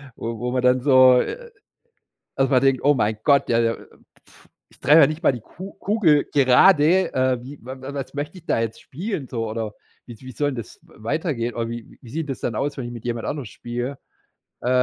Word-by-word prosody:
wo 115 Hz, 0 st, -5 dB
wo 125 Hz, 0 st, -2 dB
man 125 Hz, 0 st, 0 dB
dann 125 Hz, 0 st, +3 dB
so 130 Hz, -2 st, +6 dB, 1.2 s
also 135 Hz, +1 st, +1 dB
man 130 Hz, -2 st, +4 dB
denkt: 135 Hz, -2 st, +2 dB
„Oh 145 Hz, +1 st, +5 dB
mein 110 Hz, -4 st, 0 dB
Gott, 140 Hz, -2 st, +3 dB
ja, 115 Hz, -, +3 dB
äh, 115 Hz, -1 st, -1 dB, 0.4 s
pf, -, -, -22 dB, 0.2 s
ich -, -, -22 dB
treffe 150 Hz, +4 st, +6 dB
ja -, -, +7 dB
nicht 155 Hz, +3 st, -5 dB
mal -, -, +5 dB
die 125 Hz, -, -6 dB
Ku 185 Hz, -, -11 dB
Kugel 185 Hz, -9 st, +2 dB
gerade, 155 Hz, +6 st, +5 dB
äh, 130 Hz, -1 st, +1 dB
wie 135 Hz, +3 st, -10 dB
wa 130 Hz, +1 st, -6 dB, 0.2 s
was 135 Hz, -2 st, -6 dB
möchte 145 Hz, +6 st, -5 dB
ich 170 Hz, -, -15 dB
da -, -, +1 dB
jetzt 115 Hz, -1 st, -3 dB
spielen 170 Hz, -, -5 dB
so 115 Hz, -3 st, -3 dB
oder 110 Hz, -1 st, -4 dB, 0.3 s
wie 120 Hz, -, -10 dB
s 110 Hz, -, -17 dB
wie 130 Hz, 0 st, -9 dB
soll 145 Hz, +3 st, -1 dB
denn 130 Hz, -, -7 dB
das 115 Hz, -, -8 dB
w -, -, -24 dB
weitergehen.“ 125 Hz, -3 st, -2 dB
Oder: 115 Hz, -1 st, -2 dB
„Wie 115 Hz, -1 st, -8 dB
wie 120 Hz, -, -13 dB
sieht 160 Hz, +1 st, -3 dB
denn 135 Hz, -, -2 dB
das -, -, -13 dB
dann 115 Hz, -, -2 dB
aus, 145 Hz, +5 st, -2 dB
wenn 130 Hz, -, -4 dB
ich 120 Hz, -, -6 dB
mit 120 Hz, -2 st, -9 dB
jemand 120 Hz, -1 st, -3 dB
anderes 140 Hz, -8 st, -4 dB
spiele.“ 120 Hz, +5 st, -5 dB, 0.6 s
Äh, 125 Hz, -, -3 dB
130 Hz, 230 wpm, -22 LUFS, 120-145 Hz, 1.2 s, ja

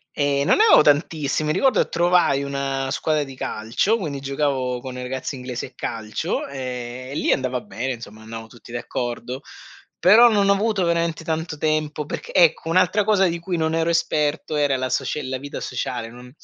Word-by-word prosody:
Ehm, 140 Hz, -1 st, +1 dB
non -, -, +4 dB
ne 430 Hz, -, +5 dB
avevo 435 Hz, -, +7 dB
tantissimi, 150 Hz, 0 st, +1 dB
ricordo 260 Hz, -, +3 dB
che -, -, -2 dB
trovai 175 Hz, -5 st, +3 dB
una 135 Hz, -1 st, -2 dB
squadra 155 Hz, +1 st, 0 dB
di 135 Hz, -1 st, -10 dB
calcio, 115 Hz, -, 0 dB
quindi 150 Hz, -9 st, -4 dB
giocavo 135 Hz, -2 st, -1 dB
con 125 Hz, +1 st, -7 dB
i 125 Hz, -, -6 dB
ragazzi 130 Hz, +2 st, -4 dB
inglesi 125 Hz, -1 st, -5 dB
a -, -, -12 dB
calcio 110 Hz, -2 st, -3 dB
e 130 Hz, -1 st, -6 dB
lì -, -, +1 dB
andava 130 Hz, -2 st, 0 dB
bene 130 Hz, +1 st, -4 dB
insomma, 110 Hz, -2 st, -10 dB
andavo 115 Hz, 0 st, -8 dB
tutti 115 Hz, +1 st, -15 dB
d'accordo, 120 Hz, +2 st, -4 dB, 0.6 s
però 225 Hz, +6 st, +7 dB
non 200 Hz, -2 st, +3 dB
ho 200 Hz, -, +6 dB
avuto 210 Hz, -1 st, 0 dB
veramente 170 Hz, -1 st, 0 dB
tanto 160 Hz, -1 st, -3 dB
tempo 155 Hz, -1 st, -1 dB
perc -, -, -6 dB
ecco 165 Hz, -2 st, +4 dB
un'altra 185 Hz, +4 st, +3 dB
cosa 200 Hz, -2 st, +3 dB
di 170 Hz, -1 st, -1 dB
cui 175 Hz, +1 st, -3 dB
non 160 Hz, 0 st, 0 dB
ero 165 Hz, 0 st, +1 dB
esperto 155 Hz, -2 st, 0 dB
era 145 Hz, -2 st, +2 dB
la 130 Hz, 0 st, -1 dB
socie 135 Hz, +3 st, -1 dB
la 130 Hz, 0 st, -3 dB
vita 140 Hz, +2 st, -7 dB
sociale 120 Hz, -2 st, -4 dB
non 125 Hz, +1 st, -12 dB
145 Hz, 185 wpm, -22 LUFS, 125-165 Hz, 0.6 s, avevo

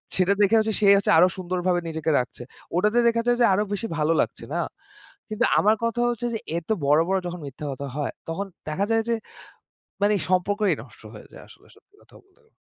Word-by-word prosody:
সেটা 185 Hz, +2 st, +3 dB
দেখে 205 Hz, +3 st, +4 dB
হচ্ছে 220 Hz, 0 st, 0 dB
সে 210 Hz, -, +1 dB
হচ্ছে 200 Hz, -, +1 dB
আরও 180 Hz, +2 st, +7 dB
সুন্দরভাবে 180 Hz, 0 st, -1 dB
নিজেকে 160 Hz, 0 st, -2 dB
রাখছে। 125 Hz, -, -6 dB, 0.3 s
ওটাতে 210 Hz, +6 st, +2 dB
দেখা 230 Hz, 0 st, +2 dB
যায় 240 Hz, 0 st, +3 dB
যে -, -, +7 dB
আরও 205 Hz, +2 st, +2 dB
বেশি 225 Hz, +3 st, -3 dB
ভালো 155 Hz, +2 st, +2 dB
লাগছে, -, -, -4 dB
না? -, -, 0 dB, 0.7 s
কিন্তু 215 Hz, +2 st, +1 dB
আমার 215 Hz, +2 st, +4 dB
কথা 230 Hz, +1 st, 0 dB
হচ্ছে 240 Hz, 0 st, -3 dB
যে 225 Hz, -, -2 dB, 0.2 s
এত 170 Hz, -, -7 dB, 0.2 s
বড়, 150 Hz, +2 st, +4 dB
বড় 190 Hz, 0 st, +1 dB
যখন 175 Hz, 0 st, -5 dB
মিথ্যা 140 Hz, +2 st, -8 dB
কথা 140 Hz, +1 st, -6 dB
হয়, 145 Hz, -2 st, -3 dB, 0.2 s
তখন 195 Hz, +5 st, -3 dB, 0.2 s
দেখা 190 Hz, +7 st, -1 dB
যায় 225 Hz, 0 st, +2 dB
যে -, -, +2 dB, 0.9 s
মানে 205 Hz, +1 st, +3 dB, 0.2 s
সম্পর্কই 200 Hz, +3 st, +2 dB
নষ্ট -, -, -17 dB
হয়ে -, -, -12 dB
যায় -, -, -12 dB
আসলে -, -, -19 dB
সত্যি 410 Hz, -, -27 dB
কথা -, -, -20 dB
বলতে 385 Hz, -1 st, -32 dB
গে -, -, -32 dB
200 Hz, 210 wpm, -24 LUFS, 170-220 Hz, 0.9 s, আরও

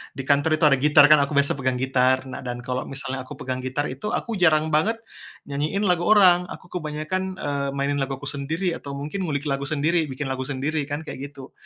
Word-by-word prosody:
di 135 Hz, -, -5 dB
kantor 145 Hz, +3 st, +2 dB
itu 155 Hz, -, -4 dB
ada 145 Hz, -3 st, +6 dB
gitar 150 Hz, +1 st, +6 dB
kan 155 Hz, -, +8 dB
aku 140 Hz, +1 st, 0 dB
biasa 140 Hz, 0 st, +2 dB
pegang 130 Hz, -1 st, 0 dB
gitar, 130 Hz, 0 st, +2 dB
nah 130 Hz, -1 st, -7 dB
dan 120 Hz, -1 st, -6 dB
kalo 125 Hz, +1 st, -3 dB
misalnya 135 Hz, -1 st, -5 dB
aku -, -, -8 dB
pegang 130 Hz, 0 st, -4 dB
gitar 130 Hz, +3 st, -2 dB
itu 135 Hz, +11 st, -3 dB
aku 230 Hz, -4 st, -3 dB
jarang 160 Hz, -2 st, +3 dB
banget, 160 Hz, +10 st, +2 dB, 0.5 s
nyanyiin 150 Hz, +8 st, -2 dB
lagu 180 Hz, -3 st, +1 dB
orang. 180 Hz, -4 st, +6 dB
Aku 180 Hz, 0 st, -11 dB
kebanyakan, 180 Hz, +3 st, -3 dB
eee, 140 Hz, -4 st, -2 dB
mainin 140 Hz, +1 st, -1 dB
laguku 135 Hz, 0 st, -3 dB
sendiri, 160 Hz, +6 st, -2 dB
atau 140 Hz, -1 st, -7 dB
mungkin 155 Hz, +7 st, -4 dB
ngulik 145 Hz, -2 st, -2 dB
lagu 140 Hz, -1 st, -2 dB
sendiri, 155 Hz, +2 st, +1 dB
bikin 135 Hz, 0 st, -4 dB
lagu 130 Hz, 0 st, -3 dB
sendiri 145 Hz, +2 st, -2 dB
kan 145 Hz, +2 st, -4 dB
kayak 155 Hz, -, -8 dB, 0.2 s
gitu. 135 Hz, -1 st, -11 dB
145 Hz, 210 wpm, -24 LUFS, 135-160 Hz, 0.5 s, kan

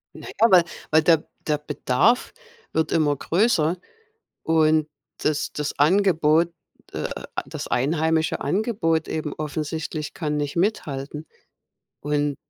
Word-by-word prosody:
Na -, -, -10 dB
ja, 230 Hz, -, +6 dB
weil 180 Hz, -2 st, +7 dB, 0.3 s
weil, 155 Hz, 0 st, +5 dB
der 160 Hz, -1 st, +4 dB, 0.2 s
der 150 Hz, -, +2 dB
Bedarf 150 Hz, -, +1 dB, 0.4 s
wird 160 Hz, -1 st, 0 dB
immer 150 Hz, -3 st, +2 dB
größer. 170 Hz, -, +1 dB, 0.7 s
Und 155 Hz, -1 st, +3 dB, 0.3 s
das 150 Hz, -1 st, 0 dB
das 150 Hz, -1 st, -3 dB
Angebot 165 Hz, -1 st, +3 dB, 0.4 s
äh, -, -, -3 dB, 0.4 s
das -, -, -6 dB
einheimische 160 Hz, +4 st, +1 dB
Angebot 165 Hz, -, 0 dB
eben 155 Hz, -2 st, -3 dB
offensichtlich 155 Hz, 0 st, -4 dB
kann 150 Hz, -3 st, -2 dB
nicht 145 Hz, -1 st, -3 dB
mithalten. 150 Hz, -6 st, -2 dB, 0.8 s
Und 145 Hz, -1 st, -1 dB
155 Hz, 115 wpm, -23 LUFS, 150-165 Hz, 0.8 s, weil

